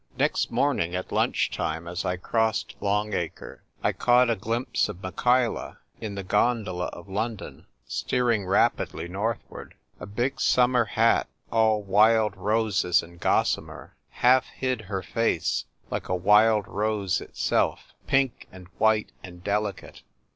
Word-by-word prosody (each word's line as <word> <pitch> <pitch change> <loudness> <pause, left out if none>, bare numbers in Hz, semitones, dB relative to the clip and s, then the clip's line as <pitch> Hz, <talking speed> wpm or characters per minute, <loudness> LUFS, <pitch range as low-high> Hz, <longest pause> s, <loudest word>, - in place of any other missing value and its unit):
Next - - +1
morning 85 +2 0
at 90 - -4
lunch - - +1
time, 80 +2 -3
as 90 0 -4
I 90 - -1
crossed 110 +4 -1
Long 105 +1 0
Acre, 85 -2 -5 0.2
I - - +3
caught 125 0 +3
a - - +1
glimpse 115 +5 -1
of 90 - -8
Michaela, 120 +5 0 0.2
in 105 -3 -5
the 100 - -5
gondola 95 -3 0
of 85 +1 -10
London, 105 +2 -5 0.2
steering 115 -6 0
rapidly 95 -2 +1
northward. 105 +5 -5 0.2
A 90 - -8
big 120 +8 -2
summer 125 -1 +3
hat, 115 +2 +2 0.2
all 110 -2 +2
wild 105 +1 +4
roses 100 -3 +1
and 85 +1 -14
gossamer, - - -1
half 125 +1 +3
hid 130 -3 -3
her 95 -2 -4
face, 115 -5 0 0.3
like - - -4
a 90 - +1
wuld 105 +3 +4
rose 105 -2 -1
itself, - - -1
pink 135 -2 +1
and 90 -1 -13
white 110 -1 +2
and 90 -1 -11
delicate. 105 -1 -3
105 Hz, 140 wpm, -26 LUFS, 95-115 Hz, 0.3 s, wild